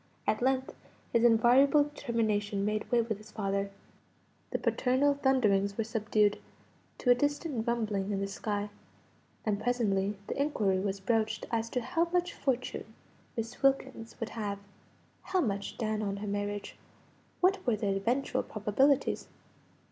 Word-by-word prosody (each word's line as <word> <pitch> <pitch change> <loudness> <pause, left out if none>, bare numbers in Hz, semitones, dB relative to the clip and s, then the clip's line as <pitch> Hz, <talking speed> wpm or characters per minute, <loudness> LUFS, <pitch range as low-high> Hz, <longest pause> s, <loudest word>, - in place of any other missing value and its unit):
At 215 - +1
length, 260 +1 +1 0.4
his 235 -1 +4
invariable 245 +6 +6
determination 215 -8 -1
made 215 0 -1
way 240 -1 +5
with 220 -3 -3
his 215 - -14
father; 200 -1 -1 0.8
the - - -1
paternal 270 +3 +2
thunderings 215 -8 +2
were 225 - +1
subdued 215 -2 +1 0.6
to 245 - +3
a - - +10
distant 290 -2 -1
rumbling 210 -4 0
in 195 - -1
the 200 - -1
sky; 205 +1 -3 0.7
and 210 -1 0
presently 210 -5 +1
the 275 - -2
inquiry 210 -10 +1
was 195 0 -2
broached 220 +1 0
as 230 -1 0
to 250 - -1
how 325 +8 +1
much 355 0 0
fortune 255 -4 -2 0.5
Miss 230 +1 -4
Wilkins 265 -4 0
would 230 - -3
have; 205 -3 -3 0.6
how 375 -1 0
much 200 - -2
down 215 -1 -1
on 200 -1 -2
her 205 +1 -5
marriage; 205 0 -3 0.6
what 380 +1 +3
were 235 - +4
the 200 -2 0
eventual 240 +8 0
probabilities. 255 +7 +1
225 Hz, 145 wpm, -31 LUFS, 205-260 Hz, 0.8 s, a